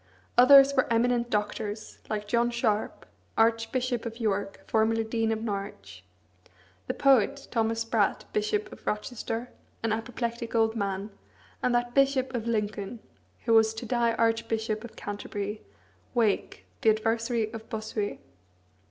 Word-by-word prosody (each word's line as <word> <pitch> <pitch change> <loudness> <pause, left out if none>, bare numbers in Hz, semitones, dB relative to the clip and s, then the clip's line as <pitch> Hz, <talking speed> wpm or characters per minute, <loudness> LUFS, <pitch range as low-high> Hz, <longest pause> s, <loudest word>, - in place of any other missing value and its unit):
Others 275 +3 +8
were 260 -2 +2
eminent 240 +1 +2
Doctors, 210 0 -3
like 210 -1 -3
John 235 +2 +2
Sharp, 230 -3 -1 0.3
Archbishop 230 +2 +1
of 230 0 -6
York, 200 -3 -1
formerly 225 0 +2
Dean 225 0 0
of 220 0 -2
Norwich; 195 - -5 0.8
the - - -2
poet, 265 -7 +3
Thomas 225 -1 +1
Spratt, 225 - +1
Bishop 425 -1 0
of - - -13
Rochester, 225 +2 -3 0.3
an 225 - +1
apoplectic 235 0 -3
old 225 0 +3
man; 200 -1 -2 0.5
and 250 -1 +2
that 240 0 0
Bishop 270 -1 +2
of 235 -2 -3
Lincoln, 210 -1 -2 0.5
who 230 - +3
was 220 0 +5
to 225 - -6
die 235 0 +1
Archbishop 225 -1 0
of 235 - -10
Canterbury, 205 0 -5 0.5
Wake, 220 -4 0 0.2
the 225 - +5
adversary 225 +1 0
of 225 0 -8
Bossuet. 215 -1 -3
225 Hz, 135 wpm, -28 LUFS, 215-240 Hz, 0.8 s, Others